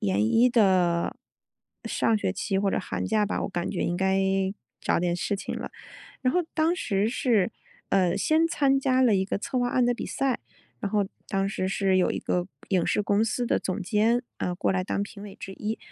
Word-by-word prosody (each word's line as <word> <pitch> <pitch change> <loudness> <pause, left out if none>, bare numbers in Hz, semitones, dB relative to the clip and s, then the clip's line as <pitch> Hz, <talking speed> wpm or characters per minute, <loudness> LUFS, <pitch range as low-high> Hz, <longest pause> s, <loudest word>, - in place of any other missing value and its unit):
研 100 +1 +1
一 235 - +4
的 185 -7 +3 0.7
上 225 -1 +1
学 190 - -1
期 195 0 -1
或 195 0 +1
者 - - +1
寒 95 -1 -3
假 210 - +2
吧， 205 - -2
我 - - -2
感 175 -1 -3
觉 190 - -2
应 175 - -1
该 190 +1 +2 0.6
找 - - +1
点 175 0 0
事 200 +3 -1
情 - - -5
了。 - - -6 0.5
然 255 -1 +1
后 360 - +4
当 320 +2 +2
时 205 - 0
是， 230 -6 +1 0.4
呃， 185 -3 +3
先 320 +1 +3
参 275 -5 +2
加 260 -1 +2
了 245 -5 +5
一 190 -1 +2
个 200 - -2
策 260 +6 -4
划 245 - +1
案 250 0 +2
的 245 - +2
比 - - -5
赛， 270 -2 -1 0.4
然 200 - -2
后 205 -1 +1 0.2
当 195 -1 0
时 185 -1 -2
是 195 -1 +1
有 180 - +2
一 - - -2
个 180 0 -1 0.2
影 185 -3 +2
视 210 - +1
公 205 +2 +2
司 240 +2 -1
的 - - +2
总 190 +2 -3
监， 220 +5 +2 0.2
啊， 180 - -1
过 180 - 0
来 185 -1 0
当 200 - -1
评 200 0 -8
委 205 -2 -9
之 195 - -8
一， 215 +3 -4
200 Hz, 235 characters per minute, -26 LUFS, 185-240 Hz, 0.7 s, 了